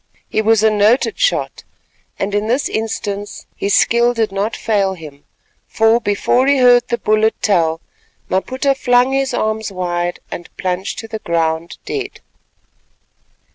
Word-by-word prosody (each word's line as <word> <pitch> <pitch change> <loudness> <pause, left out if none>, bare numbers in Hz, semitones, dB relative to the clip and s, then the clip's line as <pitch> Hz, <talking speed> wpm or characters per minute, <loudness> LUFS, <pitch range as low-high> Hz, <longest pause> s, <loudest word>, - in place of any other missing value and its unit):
He 215 - 0
was 220 0 +3
a 220 - +5
noted 215 +4 +2
shot, - - 0 0.5
and 200 +1 -3
in 205 +1 0
this 255 +4 +1
instance 205 -2 -4
his 200 0 0
skill 240 +1 +3
did 225 -3 0
not 200 +3 -2
fail 200 -3 0
him; 150 -4 -12 0.4
for, 225 +1 +3
before 240 +4 +1
he 280 0 +4
heard 245 -1 +5
the 235 - -1
bullet 215 0 +1
tell, 165 -5 +1 0.5
Maputa 260 +8 0
flung 250 -1 +2
his 270 -1 0
arms 220 -3 -2
wide 175 -1 -2
and 175 - -7
plunged 185 +1 -3
to 225 - -7
the 220 0 -6
ground 165 -2 -2
dead. 400 -2 -5
215 Hz, 145 wpm, -17 LUFS, 190-240 Hz, 0.5 s, a